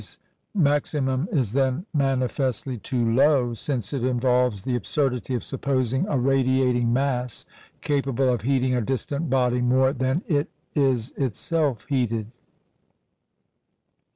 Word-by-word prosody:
Pouillet's - - -8 0.4
maximum 145 -3 +1
is 125 - 0
then 135 +5 +1
manifestly 135 -2 0
too 120 +1 -2
low, 130 -2 +3
since 120 -2 -3
it 135 -4 -2
involves 125 -4 +1
the 125 +1 -1
absurdity 125 +1 -1
of 120 - -3
supposing 130 - -1
a 145 - 0
radiating 130 -2 +2
mass 125 -2 -1 0.4
capable 135 -3 +1
of 120 - -2
heating 130 +1 +1
a 125 - +1
distant 135 +6 -2
body 125 -1 +2
more 130 +2 +3
than 130 +5 -1
it 145 -3 0 0.2
is 130 -5 +1
itself 135 0 -1
heated. 115 -5 -1
130 Hz, 125 wpm, -24 LUFS, 125-140 Hz, 0.4 s, low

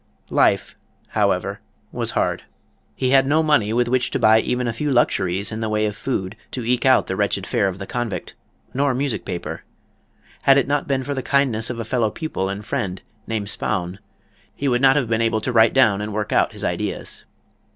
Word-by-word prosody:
Life, - - +2 0.3
however, - - 0 0.3
was - - -2
hard. - - 0 0.5
He 130 -1 0
had 135 0 +5
no 155 +3 +3
money 145 -9 +2
with 120 +1 +1
which 125 0 +1
to - - -1
buy 110 0 +5
even 125 +2 -1
a 115 - -1
few 145 +6 -2
luxuries 100 -5 +1
in 110 - -4
the 110 -1 -2
way 105 0 +1
of 105 -1 -2
food 100 -7 -3 0.2
to 125 -3 -4
eke 125 +2 +1
out 130 -1 +5
the 95 - -3
wretched 100 -1 0
fare 100 - +1
of 95 -1 -3
the 95 - -6
Convict, 120 -2 -4 0.4
nor 135 0 +1
music 135 -2 -2
paper. 85 - -5 0.8
Had 135 0 +5
it 140 - +2
not 145 0 0
been 135 -1 0
for 145 - -3
the 135 - -2
kindness 130 -5 +1
of 120 -2 -4
a 115 - -3
fellow 115 -2 +1
pupil 105 - -3
and 100 +2 -5
friend, 95 -3 -3 0.2
named 110 -3 -2
Spaun, 90 -2 -2 0.6
he 140 - -2
would 120 -1 +2
not 135 0 +6
have 140 -5 +1
been 110 0 0
able 115 -1 +1
to 125 - -2
write 110 +1 +5
down 110 -7 +4
and 105 +1 -4
work 105 -1 -2
out - - +3
his - - -9
ideas. - - -3
115 Hz, 210 wpm, -21 LUFS, 105-130 Hz, 0.8 s, not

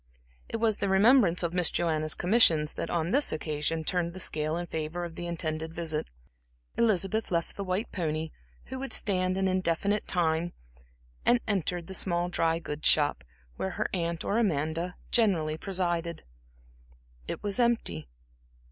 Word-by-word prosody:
It - - -2
was 220 -2 +1
the 200 - 0
remembrance 195 -2 +5
of 170 0 -1
Miss 180 -2 +3
Joanna's 155 -2 0
commissions 175 -6 +4
that - - -4
on 170 0 -1
this 285 +5 +4
occasion 155 +1 -2
turned 170 0 -1
the 185 - -7
scale 155 -2 +1
in 175 - -3
favor 160 +1 -4
of 170 - -8
the 175 +1 -6
intended 160 -1 -3
visit. 160 -2 -3 0.7
Elizabeth 215 -1 +1
left 170 -2 -2
the 200 - -4
white 190 +4 -2
pony, 160 -3 -2 0.3
who 260 +1 -6
would 270 0 -4
stand 185 -2 +1
an 190 0 +1
indefinite 185 +2 0
time, 170 -1 0 0.7
and 245 - +4
entered 180 -4 -1
the 190 - -8
small 175 -2 +1
dry 165 -2 +1
goods 155 -2 -3
shop, 145 - +3 0.3
where 95 - -2
her - - 0
aunt 170 -2 -2
or 210 - +1
Amanda 165 -2 -1 0.2
generally 170 -10 +2
presided. 175 -2 -2 1.0
It - - -5
was 205 +2 -1
empty. 225 - +1
175 Hz, 155 wpm, -28 LUFS, 160-195 Hz, 1.0 s, remembrance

